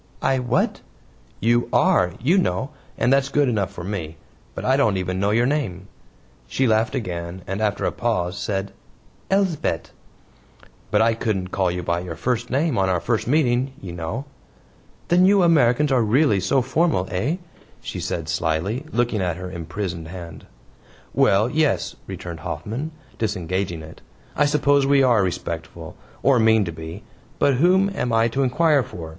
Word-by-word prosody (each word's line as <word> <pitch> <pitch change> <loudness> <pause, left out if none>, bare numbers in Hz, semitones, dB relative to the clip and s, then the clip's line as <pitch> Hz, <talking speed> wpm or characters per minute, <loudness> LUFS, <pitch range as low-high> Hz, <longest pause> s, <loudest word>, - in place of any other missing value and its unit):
"I 135 -1 +2
WHAT?" 125 -1 0 0.6
"You 120 +1 +2
ARE, 90 -2 +3
you 170 - +3
know, 130 - -1 0.3
and 125 - +3
that's 135 0 +2
good 145 -1 +2
enough 105 -7 0
for 85 - -8
me, 85 -5 -5 0.4
but - - -5
I 130 - +4
don't 110 -8 +2
even 90 0 -2
know 100 +1 +1
your 115 +3 +3
name." 100 - -2 0.6
She 130 - 0
laughed 110 +2 +2
again, 90 -5 -4
and 95 +3 -4
after 105 -2 0
a - - +1
pause, 100 -6 -1
said: 100 -1 -3 0.6
"Elsbeth." 185 - 0 1.0
"But - - +3
I 115 0 +3
couldn't 100 -5 -2
call 95 -2 +1
you 90 0 -3
by 85 0 0
your 85 -2 -6
first 120 +6 -2
name 140 -2 +1
on 95 -1 +2
our 90 -2 +1
first 110 +7 -1
meeting, 130 -2 +2
you 95 - -8
know." 85 - -4 0.8
"Then 180 +2 +5
you 200 -1 +5
Americans 150 -4 +4
are 130 -2 +4
really 110 0 +3
so 100 +8 +2
very 130 +2 -9
formal 155 - +2
eh?" 110 - 0 0.4
she - - -6
said 80 -2 -3
slyly, 80 - -1
looking 120 -4 0
at 90 -2 -1
her 90 0 -6
imprisoned 85 0 -5
hand. 85 -1 -9 0.7
"Well, 100 +3 +4
yes," 150 +2 0
returned 85 -2 -7
Hoffman, 105 - -4 0.3
disengaging 90 -5 -2
it. 80 - -12 0.3
"I 145 - +3
suppose 145 -1 +3
we 140 -1 +4
are 120 -5 +4
respectful, 85 -2 -4 0.3
or 135 -3 +4
mean 110 -2 +4
to 85 - -4
be. 80 +5 -8 0.3
But 140 -3 +3
whom 185 +6 +4
am 125 -10 -2
I 115 +1 +3
to 135 +4 -1
inquire 145 +3 +3
for? 80 -9 -8
110 Hz, 170 wpm, -22 LUFS, 90-135 Hz, 1.0 s, Then